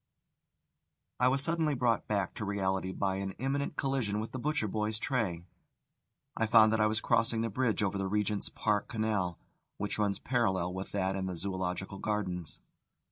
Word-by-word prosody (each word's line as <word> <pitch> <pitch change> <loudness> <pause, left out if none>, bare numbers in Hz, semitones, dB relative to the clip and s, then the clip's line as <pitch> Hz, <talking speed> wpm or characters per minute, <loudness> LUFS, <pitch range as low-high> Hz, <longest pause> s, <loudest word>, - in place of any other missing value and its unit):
I 125 - +5
was 135 +2 +4
suddenly 160 -2 +1
brought 120 -2 +1
back 100 -3 0
to - - -5
reality 95 -2 -1
by 95 0 -1
an 95 0 -3
imminent 140 +5 -2
collision 130 -8 0
with 110 - -4
the 130 - -4
butcher 145 -4 0
boy's 105 +1 -1
tray. 105 -10 -1 0.9
I 115 - +1
found 110 -1 +7
that 110 - +2
I 110 - +5
was 110 0 0
crossing 115 -1 +2
the 115 - 0
bridge 115 -1 +1
over 100 0 0
the 95 - -1
Regent's 105 0 0
Park 105 -2 0
Canal, 105 -6 -1 0.4
which 105 +1 -3
runs 100 -2 +1
parallel 95 -8 0
with 95 +1 -5
that 95 -1 0
in 95 -1 -2
the 90 -2 -4
Zoological 95 +1 -3
Gardens. 90 -6 -2
105 Hz, 175 wpm, -31 LUFS, 95-115 Hz, 0.9 s, found